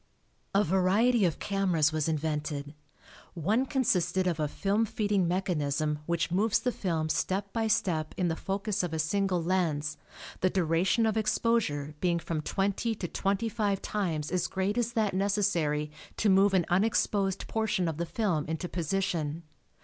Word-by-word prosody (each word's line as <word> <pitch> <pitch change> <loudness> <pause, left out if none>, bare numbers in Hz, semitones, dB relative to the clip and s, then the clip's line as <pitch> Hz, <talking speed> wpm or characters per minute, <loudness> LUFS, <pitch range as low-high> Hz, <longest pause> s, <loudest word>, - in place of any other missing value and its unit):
A 200 - +5
variety 195 +5 +3
of 170 - 0
cameras 185 -6 +1
was 155 0 0
invented. 150 -2 -2 0.6
One 210 - +1
consisted 185 -9 +1
of 170 -3 0
a 150 - +1
film 200 +8 0
feeding 205 -4 0
mechanism 155 -5 0
which 170 0 0
moves 210 +4 +2
the 250 - 0
film 165 -8 -1
step 195 +5 -1
by 225 -1 0
step 175 -8 0
in 180 - +1
the 165 - 0
focus 200 +3 -2
of 175 -3 -3
a - - -1
single 180 +2 0
lens, 160 -5 0 0.4
the 185 - +2
duration 185 +5 +2
of 220 0 +1
exposure 215 -9 0
being 175 -2 +2
from 165 -2 -3
twenty 200 +7 -1
to 185 - -4
twenty 200 +6 -1
five 205 -3 0
times 165 -8 -2
as 180 -2 0
great 190 +2 -1
as 240 -1 -1
that 215 -4 +1
necessary 175 -7 0 0.3
to 210 - +3
move 195 +1 +5
an 175 -3 +3
unexposed 195 0 +1
portion 210 -5 0
of 160 -2 -3
the 170 0 -2
film 175 -7 0
into 160 +3 -3
position. 170 -3 -2
185 Hz, 160 wpm, -29 LUFS, 160-205 Hz, 0.6 s, A